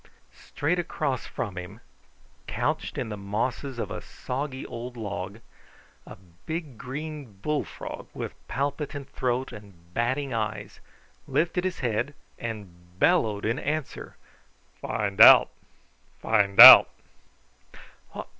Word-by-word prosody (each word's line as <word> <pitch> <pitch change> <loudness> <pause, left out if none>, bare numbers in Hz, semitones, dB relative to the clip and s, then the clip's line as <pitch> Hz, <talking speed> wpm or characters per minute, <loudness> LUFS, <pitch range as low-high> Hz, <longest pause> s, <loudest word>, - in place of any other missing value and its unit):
Straight 165 +5 -3
across 140 -6 -3
from 95 -5 -5
him, 95 +5 -10 0.7
couched - - -3
in - - -3
the 105 - -6
mosses 120 +6 -3
of - - -4
a - - -5
soggy 130 +1 -6
old 120 +1 -8
log, 100 -1 -6 0.7
a - - -10 0.3
big 160 -5 -5
green 145 -1 -7
bullfrog, 150 -1 -4
with - - -6
palpitant 140 0 -4
throat 130 +1 -2
and 90 -5 -15
batting 130 +4 -1
eyes, 110 -2 -4 0.5
lifted 175 +2 -1
his 185 -1 -3
head 125 +4 -2 0.2
and 90 -6 -9
bellowed 105 +1 +2
in 115 +3 -1
answer. 150 0 -5 0.6
"FIN' 100 -3 -3
DOUT! - - +9 0.7
FIN' 100 -3 +1
DOUT!" - - +12
120 Hz, 110 wpm, -26 LUFS, 105-145 Hz, 0.7 s, DOUT